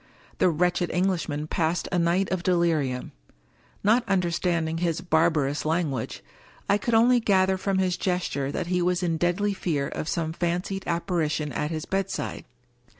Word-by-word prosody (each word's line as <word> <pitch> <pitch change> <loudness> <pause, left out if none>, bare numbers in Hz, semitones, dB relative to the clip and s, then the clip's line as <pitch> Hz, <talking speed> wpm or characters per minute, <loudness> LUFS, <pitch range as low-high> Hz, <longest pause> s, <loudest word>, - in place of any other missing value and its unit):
The - - +5
wretched 175 +2 +1
Englishman 175 -5 -1
passed 165 +1 -1
a 180 - +1
night 175 +3 +1
of 185 -2 0
delirium. 165 -8 0 0.7
Not 225 +4 +4
un 195 -1 +3
derstanding 170 -2 -1
his 165 -2 0
barbarous 160 -4 +1
language, 155 -7 -2 0.4
I 200 +1 +3
could 235 +2 0
only 240 +2 +5
gather 190 -3 +3
from 190 +1 -1
his 185 -2 +1
gesture 180 -7 -1
that 175 - -2
he 180 +1 0
was 180 +1 +1
in 165 -2 0
deadly 175 +5 +1
fear 150 -7 -1
of 155 - -4
some 160 -2 -1
fan 175 +1 0
cied 195 0 -5
apparition 170 -3 -1
at 150 +2 -2
his 160 -1 -4
bedside. 195 0 -3
175 Hz, 160 wpm, -26 LUFS, 160-185 Hz, 0.7 s, The